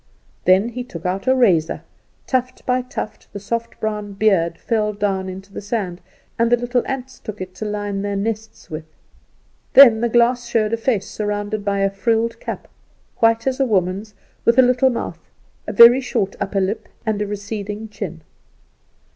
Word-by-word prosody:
Then 190 Hz, +5 st, +4 dB
he 245 Hz, +1 st, -5 dB
took 175 Hz, -9 st, -10 dB
out 190 Hz, +6 st, -2 dB
a 260 Hz, -, +5 dB
razor. 180 Hz, -11 st, +2 dB, 0.4 s
Tuft 255 Hz, 0 st, -2 dB
by 255 Hz, 0 st, +1 dB
tuft 245 Hz, -3 st, -7 dB
the 200 Hz, -, -5 dB
soft 230 Hz, +3 st, -4 dB
brown 210 Hz, -2 st, -3 dB
beard 190 Hz, -5 st, +2 dB
fell 215 Hz, -2 st, 0 dB
down 195 Hz, -2 st, -1 dB
into 195 Hz, +1 st, -9 dB
the -, -, -5 dB
sand, 200 Hz, -4 st, -3 dB, 0.4 s
and 230 Hz, 0 st, +3 dB
the 240 Hz, -, +6 dB
little 245 Hz, +1 st, 0 dB
ants 265 Hz, -1 st, -5 dB
took 215 Hz, -1 st, -8 dB
it 185 Hz, 0 st, -6 dB
to 215 Hz, -, -6 dB
line 205 Hz, -1 st, -3 dB
their 200 Hz, 0 st, -2 dB
nests 220 Hz, +2 st, -4 dB
with. 155 Hz, +1 st, -5 dB, 0.9 s
Then 235 Hz, -5 st, +9 dB
the 235 Hz, -, +1 dB
glass 240 Hz, +1 st, +3 dB
showed 225 Hz, -2 st, +1 dB
a -, -, +2 dB
face 225 Hz, -4 st, 0 dB
surrounded 205 Hz, 0 st, -3 dB
by 200 Hz, -1 st, 0 dB
a 195 Hz, 0 st, +2 dB
frilled 225 Hz, +3 st, 0 dB
cap, -, -, -6 dB, 0.5 s
white 225 Hz, 0 st, +3 dB
as 265 Hz, 0 st, 0 dB
a 270 Hz, -, +3 dB
woman's, 195 Hz, 0 st, -1 dB, 0.3 s
with 235 Hz, +1 st, +3 dB
a 260 Hz, -, +8 dB
little 250 Hz, +1 st, +4 dB
mouth, 240 Hz, -, -4 dB, 0.5 s
a -, -, -2 dB
very 240 Hz, +2 st, +8 dB
short 225 Hz, -6 st, -1 dB
upper 200 Hz, 0 st, -1 dB
lip, 195 Hz, +4 st, -2 dB, 0.2 s
and 215 Hz, -2 st, 0 dB
a 210 Hz, -, -1 dB
receding 205 Hz, +1 st, -5 dB
chin. 180 Hz, -6 st, -7 dB
215 Hz, 180 wpm, -20 LUFS, 195-235 Hz, 0.9 s, Then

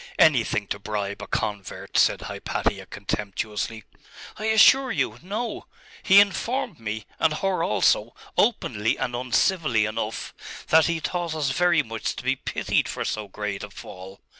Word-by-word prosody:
'Anything 120 Hz, -8 st, +4 dB
to 100 Hz, -, -4 dB
bribe 100 Hz, -1 st, -4 dB
a 100 Hz, -, -7 dB
convert,' 105 Hz, -2 st, -4 dB
said -, -, +4 dB
Hypatia -, -, -3 dB
contemptuously. 105 Hz, +2 st, -4 dB, 0.6 s
'I 215 Hz, -, -3 dB
assure 250 Hz, +4 st, +6 dB
you, -, -, -1 dB
no. 215 Hz, +6 st, -4 dB, 0.3 s
He 195 Hz, 0 st, +7 dB
informed 205 Hz, -, +1 dB
me, 110 Hz, -1 st, -4 dB
and 160 Hz, -2 st, +2 dB
her 195 Hz, +2 st, 0 dB
also, -, -, +2 dB, 0.2 s
openly 115 Hz, -, +1 dB
and 125 Hz, -, -2 dB
uncivilly 125 Hz, -, +2 dB
enough, 110 Hz, 0 st, -4 dB, 0.4 s
that 160 Hz, 0 st, +6 dB
he 170 Hz, -1 st, 0 dB
thought 170 Hz, -1 st, -2 dB
us 145 Hz, -3 st, 0 dB
very 170 Hz, +1 st, +3 dB
much 115 Hz, -3 st, -4 dB
to -, -, -7 dB
be -, -, +1 dB
pitied -, -, -1 dB
for -, -, -3 dB
so 105 Hz, -1 st, -3 dB
great 100 Hz, 0 st, -4 dB
a 105 Hz, -, -7 dB
fall.... 95 Hz, -1 st, -11 dB
120 Hz, 150 wpm, -25 LUFS, -, 0.6 s, He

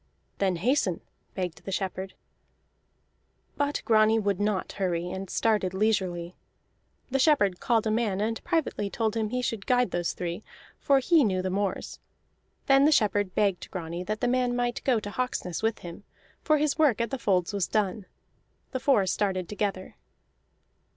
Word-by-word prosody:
"Then 190 Hz, -2 st, +1 dB
hasten," 195 Hz, -, +1 dB, 0.3 s
begged 180 Hz, -3 st, -4 dB
the 195 Hz, -, -6 dB
shepherd. 190 Hz, 0 st, -3 dB, 1.4 s
But 285 Hz, 0 st, -1 dB
Grani 220 Hz, 0 st, +4 dB
would 200 Hz, -3 st, 0 dB
not 205 Hz, -2 st, -1 dB
hurry, 180 Hz, -2 st, -2 dB
and 190 Hz, 0 st, -5 dB
started 210 Hz, -5 st, +1 dB
leisurely. 185 Hz, -4 st, 0 dB, 0.8 s
The 270 Hz, -, +1 dB
shepherd 210 Hz, -, +3 dB
called 230 Hz, -3 st, +1 dB
a 220 Hz, -, +1 dB
man, 215 Hz, -4 st, 0 dB
and 225 Hz, +2 st, -2 dB
privately 320 Hz, -, -1 dB
told 220 Hz, +1 st, -1 dB
him 220 Hz, -2 st, -1 dB
he 250 Hz, +2 st, -2 dB
should 225 Hz, -5 st, -3 dB
guide 250 Hz, -5 st, +2 dB
those 175 Hz, -1 st, -1 dB
three, 175 Hz, +3 st, -5 dB, 0.4 s
for 280 Hz, -2 st, +3 dB
he 310 Hz, +4 st, +4 dB
knew 185 Hz, -5 st, 0 dB
the 185 Hz, -, -1 dB
moors. 195 Hz, 0 st, -2 dB, 0.7 s
Then 275 Hz, +1 st, +5 dB
the 305 Hz, -, +5 dB
shepherd 205 Hz, -7 st, +2 dB
begged 200 Hz, -4 st, 0 dB
Grani 170 Hz, 0 st, -5 dB
that 215 Hz, +2 st, -3 dB
the -, -, +2 dB
man 250 Hz, 0 st, +1 dB
might 245 Hz, -1 st, -1 dB
go 250 Hz, -4 st, +2 dB
to 205 Hz, -1 st, -7 dB
Hawksness 205 Hz, -8 st, -3 dB
with 225 Hz, 0 st, 0 dB
him, 170 Hz, +3 st, -9 dB, 0.4 s
for 310 Hz, -1 st, +3 dB
his 300 Hz, 0 st, 0 dB
work 280 Hz, -9 st, +4 dB
at 235 Hz, +2 st, -1 dB
the 270 Hz, -, -3 dB
folds 185 Hz, -4 st, +1 dB
was 200 Hz, -3 st, 0 dB
done. 205 Hz, -2 st, -1 dB, 0.6 s
The 260 Hz, -, -2 dB
four 255 Hz, -7 st, +3 dB
started 185 Hz, -1 st, -1 dB
together. 200 Hz, -2 st, -3 dB
210 Hz, 165 wpm, -27 LUFS, 185-245 Hz, 1.4 s, Then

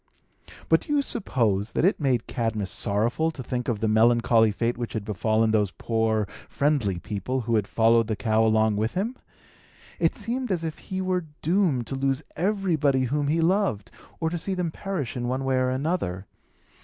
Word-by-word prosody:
But -, -, +4 dB
do 295 Hz, -, -4 dB
not -, -, +3 dB
you -, -, +4 dB
suppose 115 Hz, -, 0 dB
that -, -, +2 dB
it 195 Hz, -, +2 dB
made 130 Hz, -6 st, +1 dB
Cadmus 110 Hz, -4 st, -2 dB
sorrowful 115 Hz, +10 st, 0 dB
to 145 Hz, -5 st, -7 dB
think 125 Hz, 0 st, -3 dB
of 115 Hz, -4 st, -1 dB
the 110 Hz, -, +1 dB
melancholy 115 Hz, +1 st, +4 dB
fate 115 Hz, +3 st, -1 dB
which 120 Hz, -1 st, -5 dB
had 110 Hz, -2 st, -3 dB
befallen 110 Hz, +2 st, +1 dB
those 105 Hz, -2 st, +2 dB
poor, 110 Hz, +1 st, 0 dB, 0.2 s
friendly 140 Hz, -11 st, +1 dB
people, 105 Hz, +8 st, -3 dB
who 115 Hz, 0 st, -2 dB
had 105 Hz, -3 st, +1 dB
followed 115 Hz, 0 st, +3 dB
the 110 Hz, -, -1 dB
cow 110 Hz, 0 st, +1 dB
along 110 Hz, -1 st, +3 dB
with 110 Hz, +2 st, -1 dB
him? 220 Hz, +7 st, -1 dB, 0.8 s
It -, -, +2 dB
seemed 245 Hz, +2 st, -3 dB
as 175 Hz, -3 st, 0 dB
if 160 Hz, -1 st, -4 dB
he 190 Hz, 0 st, -4 dB
were 185 Hz, -3 st, -1 dB, 0.2 s
doomed 165 Hz, -, +2 dB
to 135 Hz, -, -5 dB
lose 135 Hz, +2 st, 0 dB
everybody 165 Hz, -8 st, +1 dB
whom 145 Hz, +3 st, 0 dB
he 160 Hz, +3 st, +1 dB
loved, 170 Hz, -, +1 dB, 0.3 s
or 160 Hz, -1 st, -1 dB
to 175 Hz, -, -2 dB
see 190 Hz, +3 st, -2 dB
them 175 Hz, -3 st, -1 dB
perish 175 Hz, -, -4 dB
in 120 Hz, -1 st, -2 dB
one 130 Hz, +2 st, -2 dB
way 135 Hz, -1 st, +1 dB
or 130 Hz, 0 st, +2 dB
another. 130 Hz, -, -2 dB
125 Hz, 190 wpm, -25 LUFS, 110-165 Hz, 0.8 s, But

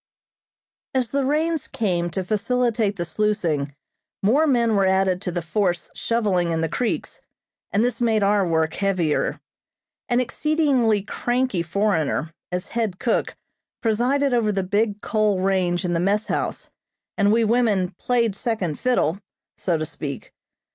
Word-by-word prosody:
As 255 Hz, -3 st, +1 dB
the 280 Hz, 0 st, +1 dB
rains 310 Hz, +3 st, 0 dB
came 175 Hz, -5 st, -1 dB
to 185 Hz, +3 st, -3 dB
facilitate 220 Hz, +1 st, 0 dB
the 175 Hz, -3 st, -3 dB
sluicing, 165 Hz, -9 st, -1 dB, 0.5 s
more 275 Hz, +11 st, +4 dB
men 235 Hz, -5 st, +3 dB
were 195 Hz, -1 st, +3 dB
added 190 Hz, -1 st, +2 dB
to 185 Hz, -, -3 dB
the 175 Hz, -1 st, -3 dB
force 175 Hz, +1 st, -1 dB
shovelling 200 Hz, -7 st, 0 dB
in 165 Hz, -1 st, 0 dB
the 165 Hz, -, +1 dB
creeks, 235 Hz, +8 st, -3 dB, 0.5 s
and 210 Hz, +4 st, +2 dB
this 245 Hz, 0 st, -2 dB
made 220 Hz, -3 st, +2 dB
our 200 Hz, 0 st, +3 dB
work 160 Hz, -2 st, +1 dB
heavier. 185 Hz, -6 st, 0 dB, 0.7 s
An 245 Hz, 0 st, +3 dB
exceedingly 255 Hz, -5 st, +1 dB
cranky 240 Hz, -2 st, -1 dB
foreigner, 165 Hz, -3 st, 0 dB, 0.2 s
as 180 Hz, +1 st, -3 dB
head 225 Hz, -6 st, -2 dB
cook, 235 Hz, -, 0 dB, 0.5 s
presided 250 Hz, +5 st, +2 dB
over 225 Hz, -3 st, +2 dB
the 195 Hz, -2 st, -1 dB
big 205 Hz, +2 st, 0 dB
coal 215 Hz, -3 st, +1 dB
range 185 Hz, -1 st, +1 dB
in 175 Hz, -, 0 dB
the 170 Hz, -, +1 dB
mess 200 Hz, +4 st, +1 dB
house, -, -, -3 dB, 0.4 s
and 200 Hz, -1 st, +3 dB
we 230 Hz, +1 st, +3 dB
women 215 Hz, -5 st, +2 dB
"played 235 Hz, -5 st, +1 dB
second 200 Hz, -9 st, -2 dB
fiddle," 200 Hz, -9 st, +1 dB, 0.4 s
so 175 Hz, -3 st, 0 dB
to 155 Hz, -, -2 dB
speak. 145 Hz, -2 st, -6 dB
205 Hz, 150 wpm, -23 LUFS, 180-235 Hz, 0.7 s, more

